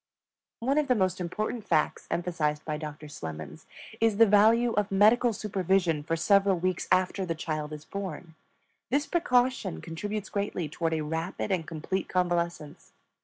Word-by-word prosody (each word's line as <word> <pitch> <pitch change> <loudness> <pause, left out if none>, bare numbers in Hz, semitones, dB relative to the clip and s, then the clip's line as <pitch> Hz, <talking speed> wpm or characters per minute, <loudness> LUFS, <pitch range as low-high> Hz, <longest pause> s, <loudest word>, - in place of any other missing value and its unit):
One 275 +5 +2
of 300 - 0
the 250 - +3
most 185 -3 0
important 215 +6 -3
facts 155 -5 0
emphasized 160 -4 -1
by 155 -1 -2
Doctor 150 0 -7
Slemons 80 - -8 0.3
is 225 -2 +2
the 230 - +8
value 225 +3 +4
of 210 -1 0
medical 220 +5 +5
supervision 190 -6 0
for 165 +3 -1
several 195 +2 +3
weeks 185 0 -1
after 185 +1 +2
the 170 -3 -2
child 155 -1 -4
is 150 0 -8
born; 190 -4 -6 0.6
this 285 +3 +1
precaution 255 - +1
contributes 205 - -5
greatly 200 -5 -2
toward 165 +2 -1
a 155 - -1
rapid 160 +6 -3
and 175 -4 -1
complete 170 +4 -3
convalescence. 170 -4 -2
185 Hz, 155 wpm, -28 LUFS, 160-210 Hz, 0.6 s, the